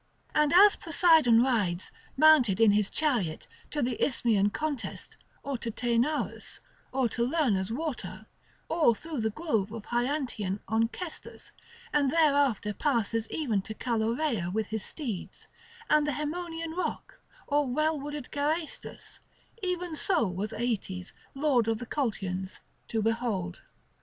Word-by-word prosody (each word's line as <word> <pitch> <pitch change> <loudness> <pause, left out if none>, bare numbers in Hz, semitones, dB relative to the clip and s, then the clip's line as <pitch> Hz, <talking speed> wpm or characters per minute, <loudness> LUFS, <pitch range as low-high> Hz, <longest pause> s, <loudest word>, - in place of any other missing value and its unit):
And 300 -1 +3
as 400 +3 +8
Poseidon 320 -8 +4
rides, 200 -9 0 0.3
mounted 275 -10 +6
in 225 -2 +6
his 205 -1 +2
chariot, 235 - 0 0.2
to 295 -2 -1
the 240 -1 -1
Isthmian 220 -6 +2
contest 295 +1 -4 0.3
or 275 -3 -3
to 235 - -4
Taenarus, 240 +6 -1 0.3
or 260 -1 +1
to 235 +2 -1
Lerna's 235 - +1
water, 295 +1 -4 0.4
or 315 -8 +3
through 310 0 -5
the 220 - +1
grove 220 - -1
of 225 -2 -7
Hyantian 240 -6 -1
Onchestus, 230 +10 -3 0.4
and 285 -2 +3
thereafter 280 -9 +2
passes 230 -3 0
even 235 -11 0
to 215 +3 -8
Calaureia 230 - 0
with 220 +2 -1
his 220 -2 -3
steeds, 235 - -6 0.4
and 300 -3 +3
the 295 - 0
Haemonian 325 +3 -4
rock, 365 - -4 0.3
or 290 -1 +1
well 305 +4 +1
wooded 290 -1 -6
Geraestus; 305 +3 -3 0.4
even 360 -3 -2
so 330 -3 +2
was 190 +4 -3
Aeetes, 200 -6 -3 0.2
lord 270 -5 +2
of 225 -1 +1
the 245 - -6
Colchians, 195 -8 -3 0.3
to 220 -2 -1
behold. 220 -6 -1
245 Hz, 130 wpm, -29 LUFS, 220-305 Hz, 0.4 s, as